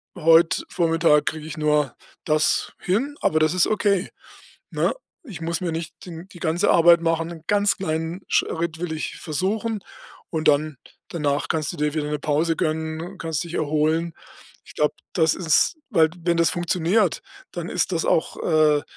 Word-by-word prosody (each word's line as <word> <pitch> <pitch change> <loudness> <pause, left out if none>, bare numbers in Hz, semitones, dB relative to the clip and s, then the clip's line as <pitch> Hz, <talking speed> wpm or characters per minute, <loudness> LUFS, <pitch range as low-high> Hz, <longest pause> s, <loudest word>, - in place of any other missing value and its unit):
heute 165 +1 +4
Vormittag 165 -3 +2
kriege 155 -1 -3
ich 155 0 -7
nur 150 -3 +1 0.3
das 155 -1 +1
hin.”, 245 +11 -1
aber 155 - +2
das 155 +1 +2
ist 180 - +4
okay, 200 -3 +1 0.6
ne? - - 0 0.3
„Ich 200 - -9
muss 165 0 -2
mir 180 -2 -2
nicht 165 +1 -5
den 170 +1 -9
die 175 - -14
ganze 170 +4 +1
Arbeit 170 0 +6
machen, 165 0 0
'n 165 -2 -10
ganz 205 -1 +2
kleinen 165 0 -3
Schritt 165 0 -1
will 175 -2 -3
ich 155 - -5
versuchen.” 205 +8 -2 0.5
Und 160 -1 0
dann 150 -1 +2 0.3
danach 145 -3 -1
kannst 155 -2 -1
du - - -9
dir 150 0 0
wieder 150 -2 -2
'ne 150 - -1
Pause 155 +3 0
gönnen 160 -1 -2
und 185 +3 -9
kannst 160 -2 -2
dich 170 0 -8
erholen. 155 +2 0 0.5
Ich - - -15
glaube, 150 0 +1 0.2
das 160 -3 +3
ist 165 - +2 0.2
weil, 160 -7 +4
wenn 170 0 +1
das 170 0 +3
funktioniert, 175 +2 +1 0.3
dann 175 -1 -5
ist - - 0
das 165 -2 0
auch 160 - +1
äh, 155 -3 +3
165 Hz, 175 wpm, -23 LUFS, 155-175 Hz, 0.6 s, Arbeit